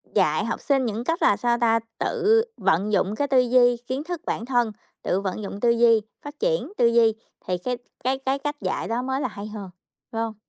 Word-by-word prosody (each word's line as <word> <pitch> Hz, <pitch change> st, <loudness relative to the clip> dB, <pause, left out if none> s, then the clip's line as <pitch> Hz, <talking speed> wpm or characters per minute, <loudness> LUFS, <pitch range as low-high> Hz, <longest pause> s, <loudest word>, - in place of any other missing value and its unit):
dạy -, -, +2 dB
học -, -, -3 dB
sinh 270 Hz, -2 st, +1 dB
những 225 Hz, 0 st, -3 dB
cách 330 Hz, +6 st, -1 dB
là, 200 Hz, -, +4 dB
sao 240 Hz, -1 st, +1 dB
ta, 230 Hz, -1 st, +4 dB, 0.2 s
tự 445 Hz, +2 st, +3 dB
vận 195 Hz, +6 st, +1 dB
dụng 205 Hz, 0 st, +1 dB
cái 285 Hz, +5 st, 0 dB
tư 270 Hz, -2 st, +4 dB
duy, 245 Hz, -1 st, +4 dB
kiến 265 Hz, +3 st, -2 dB
thức 345 Hz, 0 st, -5 dB
bản 230 Hz, -, -2 dB
thân, 240 Hz, -3 st, +1 dB, 0.3 s
tự 190 Hz, -, 0 dB
vận 195 Hz, +2 st, -4 dB
dụng 200 Hz, 0 st, -6 dB
tư 240 Hz, -, +2 dB
duy, 230 Hz, -1 st, +5 dB, 0.2 s
phát 290 Hz, +1 st, -10 dB
triển 485 Hz, -3 st, 0 dB
tư 235 Hz, -, +5 dB
duy, 230 Hz, -1 st, +4 dB, 0.3 s
thì 180 Hz, 0 st, -1 dB
cái 245 Hz, +8 st, -3 dB, 0.3 s
cái 260 Hz, +2 st, +1 dB
cái 270 Hz, +1 st, -1 dB
cách 290 Hz, +1 st, -3 dB
dạy 185 Hz, 0 st, -2 dB
đó 230 Hz, +2 st, -1 dB
mới 265 Hz, +2 st, -2 dB
là 260 Hz, -, 0 dB
hay 210 Hz, -2 st, -8 dB
hơn, 210 Hz, -3 st, -7 dB, 0.4 s
phải 225 Hz, -, -2 dB
hông? 225 Hz, -1 st, -2 dB
240 Hz, 230 wpm, -24 LUFS, 215-270 Hz, 0.4 s, duy